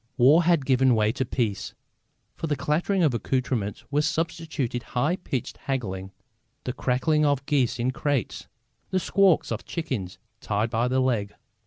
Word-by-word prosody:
War 140 +7 +6
had 170 -5 +3
given 130 -2 +4
way 110 -1 +2
to 130 +2 -2
peace. 115 -5 -2 0.6
For 165 - -4
the 150 - 0
clattering 160 +7 0
of 150 -6 +3
accoutrements 120 -4 -2
were 145 +1 +2
substituted 160 -5 -2 0.2
high 150 +8 +2
pitched 135 -9 -4
haggling, 95 -9 -4 0.5
the 125 - -3
cackling 130 +4 +1
of 140 -2 +1
geese 135 -7 +1
in 125 +2 0
crates, 140 -3 -2 0.4
the 185 - +1
squawks 195 -2 +3
of - - -3
chickens 125 - -4 0.2
tied 105 +2 -1
by 115 +2 +1
the 130 +1 +1
leg. 115 -6 0
130 Hz, 155 wpm, -26 LUFS, 120-150 Hz, 0.6 s, War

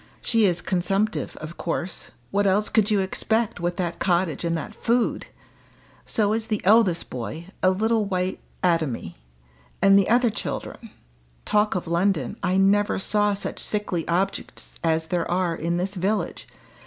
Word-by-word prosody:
She 225 -3 +3
is 180 -1 0
consumptive, 195 +4 0
of 155 +2 -9
course 175 +1 -4 0.2
what 200 0 +2
else 205 +2 +2
could 215 -1 +2
you 205 -2 +3
expect 220 +3 -1
with 175 0 -2
that 175 -2 -2
cottage 175 -5 +1
and 170 -1 0
that 215 +7 -6
food? 235 +1 0 0.8
So 210 -1 +2
is 225 0 -2
the 215 -2 0
eldest 200 -4 +4
boy 155 +8 -6
a 185 - +5
little 220 +3 +1
white 185 -1 -2 0.2
atomy! 160 - 0 0.6
And 195 0 +6
the 195 - +1
other 240 0 +4
children. - - -5 0.6
Talk 210 -1 +2
of 180 - -2
London 170 -5 0
I 185 -1 +1
never 200 +2 +3
saw 205 +1 +1
such 200 - -5
sickly 200 -6 -2
objects 185 +3 -2
as 160 -1 +1
there 170 0 -2
are 175 -1 0
in 170 +2 -1
this 190 +3 -2
village. 200 +3 -2
190 Hz, 155 wpm, -24 LUFS, 170-210 Hz, 0.8 s, And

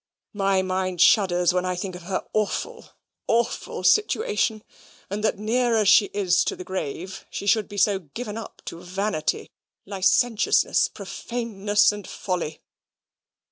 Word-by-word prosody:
My 195 -2 +1
mind 185 -1 -2
shudders 180 -2 +4
when 180 0 +1
I 185 0 -1
think 185 +1 -4
of 180 - -9
her 185 - -2
awful, 215 -1 -2 0.4
awful 235 0 -1
situation, 425 - +2 0.5
and 210 +1 -3
that, 220 - +1
near 235 +3 +1
as 210 -3 +3
she 205 - +7
is 195 -3 +1
to - - -1
the - - -8
grave, 185 0 -5
she - - -6
should 210 +1 +2
be 205 - -8
so 200 0 +3
given 210 - -7
up 225 - -9
to 170 - -7
vanity, 185 -3 -2 0.3
licentiousness, 205 +4 +2
profaneness, 210 -3 0
and 205 -1 -8
folly." 175 -5 -4
200 Hz, 140 wpm, -24 LUFS, 185-215 Hz, 0.5 s, she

